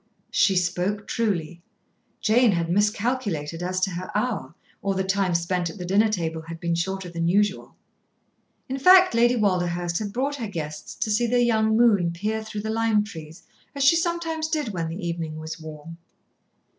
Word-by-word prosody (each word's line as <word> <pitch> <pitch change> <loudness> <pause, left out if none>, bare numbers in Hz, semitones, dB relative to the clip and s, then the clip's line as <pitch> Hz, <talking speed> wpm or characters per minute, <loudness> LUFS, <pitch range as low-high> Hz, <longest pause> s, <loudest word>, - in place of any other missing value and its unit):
She 195 -1 +3
spoke 180 +3 0
truly. 175 -7 -2 0.6
Jane 230 0 +4
had 170 -1 -1
miscalculated 205 - 0
as 185 +1 -1
to 195 - +1
her 180 +1 -5
hour, 210 - -2 0.3
or 195 -1 -1
the 190 - 0
time 190 -2 0
spent 170 0 0
at 185 - -10
the 180 - -6
dinner 205 +5 +3
table 165 -5 -2
had 165 +1 -9
been 170 0 -1
shorter 190 +2 -2
than 170 -1 -2
usual. 205 +3 +1 0.9
In 265 +1 -3
fact, 370 +3 +7
Lady 240 +1 +4
Walderhurst 175 -5 0
had 210 -2 -4
brought 275 +6 -2
her 230 -4 -4
guests 155 -6 -6
to 215 - -2
see 235 +3 +2
the 245 +1 +3
young 220 -2 +2
moon 205 -8 +4
peer 215 +5 -2
through 215 -1 -5
the 220 +1 -3
lime 225 -2 +2
trees, 160 -6 -10 0.3
as 280 - 0
she 275 +5 +6
sometimes 330 -2 -1
did 305 -7 -1
when 170 -5 -3
the 175 +2 -5
evening 165 -2 -4
was 160 +1 -7
warm. 160 +1 -10
195 Hz, 180 wpm, -24 LUFS, 170-225 Hz, 0.9 s, fact